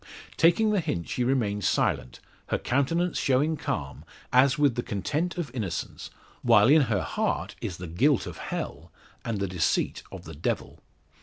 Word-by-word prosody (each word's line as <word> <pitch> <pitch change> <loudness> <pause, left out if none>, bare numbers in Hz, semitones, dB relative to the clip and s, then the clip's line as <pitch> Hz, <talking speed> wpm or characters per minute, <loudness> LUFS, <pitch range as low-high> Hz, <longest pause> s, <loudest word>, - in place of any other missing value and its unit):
Taking 210 +6 +4
the 205 - +2
hint 145 - -3
she 125 - -1
remains 110 -6 0
silent, 65 0 -1 0.3
her - - 0
countenance 165 +7 0
showing 140 +4 +2
calm, 70 - -4 0.3
as 135 +4 +5
with 145 -3 +3
the 120 - -2
content 150 - -2
of 165 -7 -3
innocence, 100 -10 -4 0.3
while 105 +3 +5
in 155 +2 +7
her 100 -4 +1
heart - - -2
is 85 - -4
the 90 - -7
guilt 115 - +2
of - - -8
hell, - - -5 0.3
and 115 -3 -2
the 100 - -1
deceit 90 -2 0
of - - -9
the - - -9
devil. 75 - -3
125 Hz, 165 wpm, -27 LUFS, 100-150 Hz, 0.3 s, in